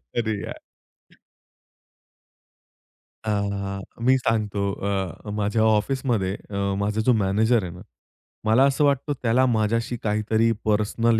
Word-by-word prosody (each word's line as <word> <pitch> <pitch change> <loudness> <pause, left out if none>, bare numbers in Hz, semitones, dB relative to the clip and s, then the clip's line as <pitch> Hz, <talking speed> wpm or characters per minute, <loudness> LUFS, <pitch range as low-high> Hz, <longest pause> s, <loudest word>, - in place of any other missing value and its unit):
अरे! 115 -2 0
यार. - - -7 2.7
हां. 100 -2 -2 0.2
मी 130 +1 +5
सांगतो 110 -4 -1 0.3
अ, 95 +1 -3
माझ्या 105 +1 0
ऑफिसमध्ये 110 -2 +1 0.2
अ, 100 - -6 0.2
माझा 105 +2 0
जो 125 +3 +3
मॅनेजर 110 +2 +2
आहे 90 - -5
ना. 90 +2 -11 0.6
मला 110 +5 +5
असं 140 +2 +1
वाटतं, 140 +1 +1
त्याला 125 +3 +3
माझ्याशी 115 +1 0
काहीतरी 110 +2 +1
पर्सनल 110 +2 +2
110 Hz, 115 wpm, -24 LUFS, 100-115 Hz, 2.7 s, मी